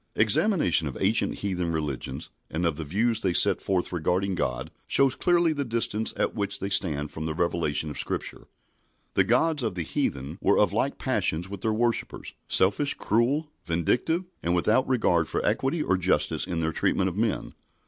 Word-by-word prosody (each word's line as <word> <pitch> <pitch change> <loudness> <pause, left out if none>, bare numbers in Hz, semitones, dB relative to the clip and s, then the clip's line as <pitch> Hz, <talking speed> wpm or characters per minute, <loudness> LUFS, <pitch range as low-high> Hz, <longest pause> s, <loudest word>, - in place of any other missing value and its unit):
Examination 90 - +2
of 70 - -6
ancient - - +2
heathen 90 -4 -2
religions 75 -5 -4 0.2
and 85 +2 -2
of 85 -3 +1
the 80 - -5
views 110 +8 0
they 95 -2 0
set - - +5
forth 95 -2 -1
regarding 90 +3 0
God 65 -7 -3 0.2
shows 135 -2 +4
clearly 175 -1 +2
the 145 -1 -2
distance 115 -3 0
at - - 0
which 100 -2 -1
they 100 +1 -5
stand 75 -7 +1
from 80 0 -5
the 80 - -3
revelation 80 -3 -1
of 75 - -6
Scripture. - - -3 0.7
The - - +4
gods 145 +5 +2
of 110 -6 -2
the 90 - -2
heathen 70 -3 -3
were - - +3
of - - +3
like - - 0
passions 85 +4 0
with 100 -2 -7
their 110 - 0
worshippers 115 +2 -2
selfish, 105 +10 +2
cruel, 135 +8 0
vindictive, 120 - 0 0.2
and 85 +1 0
without 110 +9 +2
regard 90 -10 +2
for - - -2
equity 145 +4 0
or 95 - +1
justice 90 0 0
in 85 -2 -2
their 80 0 0
treatment 95 +3 +1
of 90 - -3
men. 110 0 -1
95 Hz, 180 wpm, -26 LUFS, 85-120 Hz, 0.7 s, set